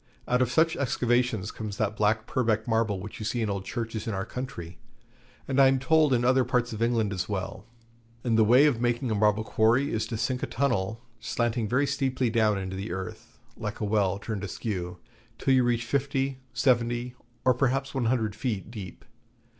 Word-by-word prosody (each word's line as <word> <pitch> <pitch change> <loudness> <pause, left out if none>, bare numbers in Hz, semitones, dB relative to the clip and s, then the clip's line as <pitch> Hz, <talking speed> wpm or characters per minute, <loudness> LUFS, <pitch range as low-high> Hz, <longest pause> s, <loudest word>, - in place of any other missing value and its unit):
Out 125 +1 +2
of 125 - +2
such 160 +2 +3
excavations 120 -5 0
comes 105 -2 -6
that 110 -1 0
black 110 +1 +1
Purbeck 115 -3 0
Marble 110 -3 +1
which 105 +3 -8
you - - -5
see 115 +2 -1
in 105 - -1
old 100 -1 -4
churches 115 -2 -4
in 110 - -1
our 95 +1 -2
country, 110 -9 -7 0.7
and 135 0 +3
I 135 - +8
am 135 0 +3
told 150 +3 +3
in 120 -1 +2
other 130 +1 +4
parts 120 -1 0
of 110 - -6
England 115 -3 +1
as 90 0 -3
well. 100 0 -4 0.6
And 115 -2 +1
the 110 - +5
way 125 +7 +6
of 130 -6 +2
making 120 0 0
a - - +2
marble 105 +1 +2
quarry 115 +6 +2
is 110 - -1
to 115 - -4
sink 125 +3 -1
a - - -2
tunnel, 115 -4 -1 0.2
slanting 115 0 -1
very 130 +5 +2
steeply 130 -3 0
down 110 -3 +2
into 95 -1 -4
the 95 0 -5
earth, 95 0 -7 0.2
like 105 0 -5
a 105 - -1
well 100 -2 +1
turned 105 0 -5
askew, 90 -3 -4 0.4
till 135 - +2
you 130 -1 +5
reach 120 -1 +1
fifty, 135 +1 -1
seventy, 120 0 +1 0.3
or 130 - +6
perhaps 135 +2 0
one 130 -3 -1
hundred 115 -3 +1
feet 110 -3 -3
deep. 100 -6 -9
115 Hz, 200 wpm, -27 LUFS, 105-125 Hz, 0.7 s, I